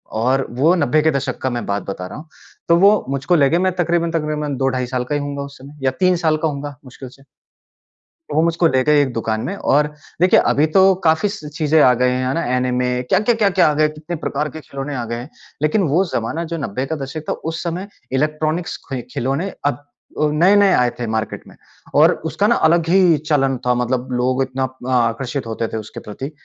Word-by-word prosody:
और 130 +4 +1
वो 160 +6 +5
90 155 -2 +2
के 160 +1 +3
दशक 140 -2 -2
का 130 - 0
मैं 120 -2 -3
बात 100 -1 -2
बता 90 -2 -6
रहा - - -9
हूँ। 155 - -11 0.4
तो 170 - +6
वो 205 +3 +5
मुझको 140 +6 0
ले 140 -4 +4
गए, 165 - +2
मैं 185 +1 +1
तकरीबन-तकरीबन 165 -4 -1
2 135 +1 +1
ढाई 130 -1 -2
साल 125 0 -2
का 145 +4 -3
ही 145 - -1
होऊँगा 140 0 -4
उस 140 0 -10
समय, 140 +3 -13
या 130 - +3
3 185 -1 +4
साल 155 -1 +3
का 160 - 0
होऊँगा 145 -1 -5
मुश्किल 130 0 -10
से। 135 +2 -19 1.1
तो - - -2
वो 160 - +4
मुझको 170 0 +2
ले 130 -3 +2
गए 150 -1 +4
एक 130 -3 -2
दुकान 110 -1 -2
में 195 - -3
और 150 -3 +2 0.3
देखिए, 180 - +5
अभी 150 +2 +2
तो 190 +4 +5
काफ़ी 160 +5 +3
स 175 -7 -7
चीज़ें 155 -1 +2
आ 125 - +6
गए, 125 - +4
है 130 +1 -1
ना, 170 - -1
ऐनिमे 125 0 0
क्या, - - +4
क्या, 235 +2 +2
क्या, 210 -3 +2
क्या 185 0 +4
आ 150 - +1
गए, 155 +1 +3
कितने 155 +3 -6
प्रकार 150 0 -2
के 160 - -9
खिलौने 140 0 -6
आ 125 -3 -3
गए 115 +1 -4
हैं। 120 +5 -8 0.3
लेकिन 155 +7 +2
वो 170 +7 +3
ज़माना 155 +9 -2
जो 165 - -1
90 130 -2 -3
का 160 - -3
दशक 140 +2 -6
था, - - +1
उस 165 +1 -5
समय 175 +3 -4 0.2
इलेक्ट्रॉनिक्स 155 +5 -1
खि 135 -2 -3
खिलौने 140 +10 -2
अब 145 - 0 0.4
अ, 150 - +3
नए-नए 195 +5 +5
आए 125 -1 +3
थे 120 - -2
मार्केट 110 0 -3
में। - - -16 0.4
और - - +6 0.2
उसका - - +1
ना - - +4 0.2
अलग 170 -1 +2
ही 175 -3 +4
चलन 135 -3 +2
था, 125 - +3
मतलब 125 +1 -1
लोग 125 +2 +1
इतना 130 0 -2 0.3
आकर्षित 125 +2 -1
होते 115 0 -3
थे - - -2
उसके 110 -1 -7
प्रति। 130 +7 -7
145 Hz, 230 wpm, -19 LUFS, 130-165 Hz, 1.1 s, तो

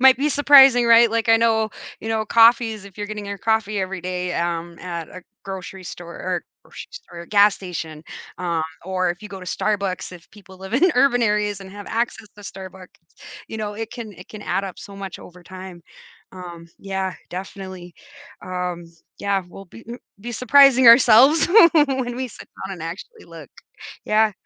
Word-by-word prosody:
Might 260 -1 +7
be 285 +4 0
surprising, 275 -4 +6
right? 230 0 +6
Like, 230 0 -1
I 225 - +6
know, 225 -1 +1 0.3
you 225 - -6
know, 220 -1 -1
coffees, 230 -2 +3
if 200 -1 -15
you're 205 - -4
getting 210 -1 -7
your 200 0 -6
coffee 220 -1 0
every 190 0 -4
day, 180 0 -4
um, 170 0 -3
at 170 -3 -6
a 185 - -11 0.2
grocery 190 -1 -8
store 170 0 -9
or 180 -1 -4 0.2
grocery - - -11
store? 175 - -11
Gas 205 +1 +4
station, 160 -4 -7 0.4
um, 170 -3 -2 0.2
or 185 -1 -1
if 175 +4 -7
you 210 - -9
go 195 -1 -9
to 185 - -11
Starbucks, 195 -1 -2
if 175 -2 -14
people 190 -2 -16
live 190 +4 -7
in 360 +7 +4
urban 250 -2 +3
areas 210 -2 0
and 190 -1 -11
have 205 +1 -10
access 230 -1 -3
to - - -13
Starbucks, 190 -1 -10 0.6
you - - -7
know, 210 -1 -5
it 225 +1 -6
can 230 -4 -8
it 180 0 -14
can 210 -1 -10
add 200 - -2
up 190 -3 -7
so 200 - -11
much 195 -2 -7
over 180 0 -14
time. 185 -1 -10 0.5
Um, 175 -2 -10
yeah, 190 -1 -4 0.2
definitely. 185 -1 -8 0.5
Um, 180 -1 -4 0.3
yeah, 200 -1 -1
we'll 195 +2 -12
be 230 +6 -14
m 240 +1 -7 0.2
be 240 +3 -7
surprising 260 +1 +5
ourselves 245 +5 +7 0.3
when 265 -6 +1
we 260 0 -4
sit - - -13 0.2
down 195 - -7
and 165 - -10
actually 195 - -9
look. - - -12 0.6
Yeah. 215 0 +3
200 Hz, 185 wpm, -21 LUFS, 185-230 Hz, 0.6 s, Might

